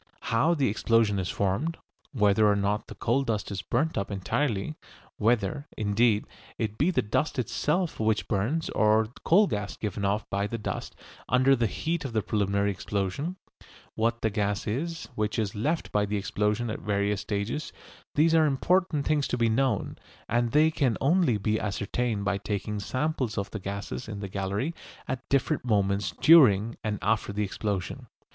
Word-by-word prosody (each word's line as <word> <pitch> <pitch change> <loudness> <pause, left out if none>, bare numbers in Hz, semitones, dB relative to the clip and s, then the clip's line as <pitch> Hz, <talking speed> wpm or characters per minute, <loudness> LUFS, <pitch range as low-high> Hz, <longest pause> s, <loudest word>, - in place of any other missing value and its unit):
How 160 +9 +3
the 140 -4 +2
explosion 110 -1 +2
is 90 - -2
formed, 115 - -1 0.3
whether 105 -4 +3
or - - +2
not 100 +1 -1
the - - -9
coal 120 +4 +1
dust 110 -6 -2
is 95 -2 -3
burnt 150 +7 0
up 100 - -3
entirely, 100 +5 -1 0.4
whether, 115 +5 +1
indeed, 105 +1 +2 0.3
it 110 -1 -3
be 150 - +3
the 185 - +1
dust 135 +8 -1
itself 150 - -1
which 110 -1 +1
burns 120 +12 -1
or 110 0 +3
coal 200 +6 +5
gas 105 - -3
given 105 -2 -4
off 100 +2 0
by 100 +1 0
the 115 - -4
dust 105 - -5 0.3
under 130 +2 +5
the 120 -3 +1
heat 160 - -2
of 135 -4 -5
the 110 -2 +1
preliminary 100 -1 +1
explosion, 100 - -3 0.6
what 115 +1 0
the 110 - +2
gas 105 -1 -1
is 160 +10 -3
which 105 0 -1
is 105 -3 -1
left 150 +11 -1
by 105 0 +1
the 105 +1 -1
explosion 105 +3 -1
at - - -4
various 100 -1 0
stages 105 +8 -3 0.4
these 160 +2 +4
are 160 -1 +5
important 155 +2 +1
things 150 -3 +1
to 125 - -1
be 115 -1 +2
known, 130 +4 0 0.3
and 120 +1 +1
they 155 +2 +4
can 135 -8 +1
only 150 - +3
be 110 +2 0
ascertained 105 +1 -2
by 100 0 0
taking 105 +1 -3
samples 130 +1 -2
of 100 0 -3
the 110 - -4
gases 100 +5 -5
in 105 -2 -5
the 100 - -4
gallery 100 - -2 0.3
at 130 0 -5
different 140 +2 +1
moments 100 -3 +1
during 115 -9 +6
and 105 -1 -1
after 105 0 +1
the 105 +1 -1
explosion. 100 -2 -3
110 Hz, 175 wpm, -27 LUFS, 100-135 Hz, 0.6 s, during